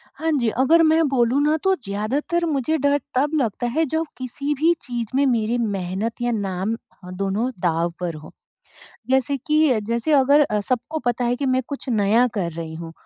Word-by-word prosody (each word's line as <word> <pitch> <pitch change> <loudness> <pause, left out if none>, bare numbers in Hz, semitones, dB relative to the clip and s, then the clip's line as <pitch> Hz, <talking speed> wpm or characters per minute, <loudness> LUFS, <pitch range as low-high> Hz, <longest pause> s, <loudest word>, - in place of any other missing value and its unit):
हाँ 320 +3 -1
जी 235 -2 +1
अगर 320 +6 +5
मैं 320 +1 +4
बोलूँ 255 +1 +2
न 300 +2 +3
तो 385 0 +3
ज़्यादातर 265 +12 -1
मुझे 310 +1 0
डर 285 0 +2 0.2
तब 285 +4 +2
लगता 240 +1 -2
है 320 +1 +3
जब 320 +3 -1
किसी 280 +3 -3
भी 335 +2 +4
चीज़ 240 -3 -4
में 280 - +3
मेरी 235 -2 +1
मेहनत 205 +1 -3
या 240 0 0
नाम 200 0 -2 0.3
ह 180 - -8
दोनों 200 +5 -1
दाव 170 -1 +1
पर 170 -3 -3
हों। 155 0 -11 0.8
जैसे 265 +1 +2
कि 305 -6 +3
जैसे 235 +6 0
अगर 285 +1 +5 0.2
सबको 255 +7 -2
पता 245 0 0
है 240 +1 +1
कि 275 +2 -3
मैं 260 0 +2
कुछ 280 -1 -7
नया 220 +2 +3
कर 175 -5 -2
रही 160 0 -6
हूँ 165 0 -7
245 Hz, 190 wpm, -22 LUFS, 205-285 Hz, 0.8 s, अगर